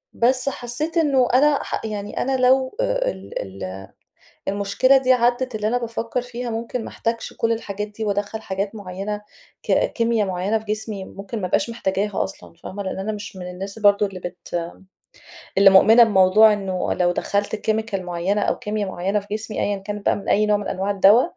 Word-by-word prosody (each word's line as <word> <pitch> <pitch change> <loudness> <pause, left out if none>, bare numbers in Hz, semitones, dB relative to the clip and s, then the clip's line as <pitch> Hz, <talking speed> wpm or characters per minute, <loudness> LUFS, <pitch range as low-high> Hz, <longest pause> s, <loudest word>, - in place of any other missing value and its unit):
بس 255 +3 +2
حسّيت 275 +7 -3
إنه 275 -6 +3
أنا 285 +2 +4
ح - - -4
يعني 210 -1 -4
أنا 265 0 0
لو 260 +1 +3
أ - - +1
ال 190 - -7 0.2
ال 95 +1 -6 0.6
المشكلة 200 +7 +3
دي 260 -1 +4
عدّت، 245 +1 +1
اللي 215 0 -1
أنا 245 - +1
بافكّر 230 +1 -3
فيها 245 0 -5
ممكن 230 +2 -3
ما - - -6
احتاجش 230 0 -3
كل 230 0 +1
الحاجات 210 -2 -4
دي 210 +1 -6
وأدخّل 205 +1 -2
حاجات 195 +2 -3
معينة 200 +1 -5 0.4
ك - - -1 0.2
كيميا 230 -2 +1
معينة 190 +3 -1
في 220 - -13
جسمي، 215 -2 -4
ممكن 200 +3 -7
ما 185 - -1
ابقاش 210 - 0
محتاجاها 205 -2 -1
أصلًا 190 - -10
فاهمة؟ 200 +2 -6
لإن 190 - -4
أنا 205 +3 -2
مش 205 -1 -7
من 180 -1 -6
الناس 195 +3 -7
برضه 205 -1 +4
اللي 190 -2 -8
بت 175 -1 -5 0.9
اللي 195 0 +8
مؤمنة 220 +5 +7
بموضوع 210 +1 +6
إنه 190 -3 -2
لو 175 -1 +2
دخّلت 205 +3 -1
chemical 220 -2 -1
معيّنة 180 +3 -1
أو - - 0
كيميا 210 -1 -2
معيّنة 190 +3 -1
في 200 - -16
جسمي، 215 0 -4
أيًا 205 - 0
كانت 205 +1 -7
بقى - - +3
من 200 - -8
أي 210 +1 +3
نوع 210 0 +3
من 205 - -5
أنواع 195 +2 -2
الدوا، 200 +4 +6
210 Hz, 190 wpm, -22 LUFS, 195-230 Hz, 0.9 s, اللي